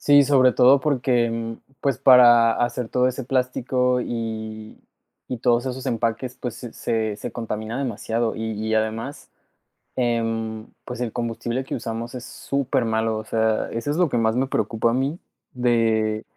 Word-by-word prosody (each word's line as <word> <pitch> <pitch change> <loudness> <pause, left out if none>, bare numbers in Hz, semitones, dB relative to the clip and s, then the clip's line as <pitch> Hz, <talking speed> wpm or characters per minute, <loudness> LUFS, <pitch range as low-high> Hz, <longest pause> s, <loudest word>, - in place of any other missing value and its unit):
Sí, 145 0 +6
sobre 130 -2 +4
todo 130 +4 +5
porque, 125 -4 +1
mm, 115 0 -4 0.2
pues, 140 -4 0
para 120 -3 +7
hacer 120 0 -1
todo 125 +2 +2
ese 130 +1 -3
plástico, 125 0 0
y, 110 -2 -5 0.5
y 125 - -4
todos 120 +1 +2
esos 130 0 -4
empaques, 115 +2 -2
pues, 125 -3 -4
se 120 -3 -8
se 110 -2 -2
se - - -6
contamina 110 +1 -4
demasiado, 115 -2 -2
y 110 - -5
y, 110 +1 -2
además, 110 +5 -3 0.7
em, 115 -2 -1 0.2
pues, 125 -1 -6
el 120 -3 -2
combustible 120 +2 -3
que - - -7
usamos 115 0 -5
es 125 -1 -6
supermalo, 115 -5 -1
o 110 - -6
sea, 110 -1 0
eso 115 +5 -3
es 150 - 0
lo 175 -4 +3
que 120 - -1
más 110 0 +1
me 130 +2 +1
preocupa 115 -3 0
a - - -1
mí 135 +6 -1 0.3
de 115 -3 +1
120 Hz, 165 wpm, -23 LUFS, 110-125 Hz, 0.7 s, para